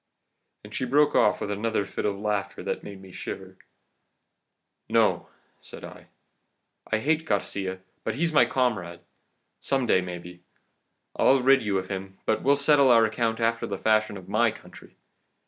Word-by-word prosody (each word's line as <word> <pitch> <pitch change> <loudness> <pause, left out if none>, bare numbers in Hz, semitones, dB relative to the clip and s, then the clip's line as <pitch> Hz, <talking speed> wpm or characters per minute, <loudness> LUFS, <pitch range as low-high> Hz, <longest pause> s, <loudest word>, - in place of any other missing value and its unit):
"And - - -12
she - - -3
broke 145 +3 +3
off 105 - +3
with 105 - -3
another 105 0 -1
fit 100 - -3
of 100 -1 -2
laughter 100 -1 -3
that - - -3
made 100 -1 -10
me 95 - -13
shiver. - - -8 1.3
"'No,' - - +2 0.3
said - - -11
I, - - -11 0.8
'I 110 - +3
hate 155 +7 0
Garcia, 95 -5 -2 0.2
but - - -2
he's 165 +3 0
my 150 - +6
comrade. 100 -10 -1 0.6
Some 135 -2 0
day, 95 - +3
maybe, 90 0 -8 0.7
I'll 135 -1 +4
rid 135 +1 +5
you 105 -3 0
of 95 0 -4
him, 95 -1 -6
but 110 - +1
we'll 140 +1 +4
settle 140 -1 +4
our 115 -2 +6
account 110 +1 -1
after 115 0 0
the 100 - -4
fashion 110 0 +1
of 95 -1 -12
my 110 +4 +2
country. 110 - -13
110 Hz, 165 wpm, -26 LUFS, 95-130 Hz, 1.3 s, my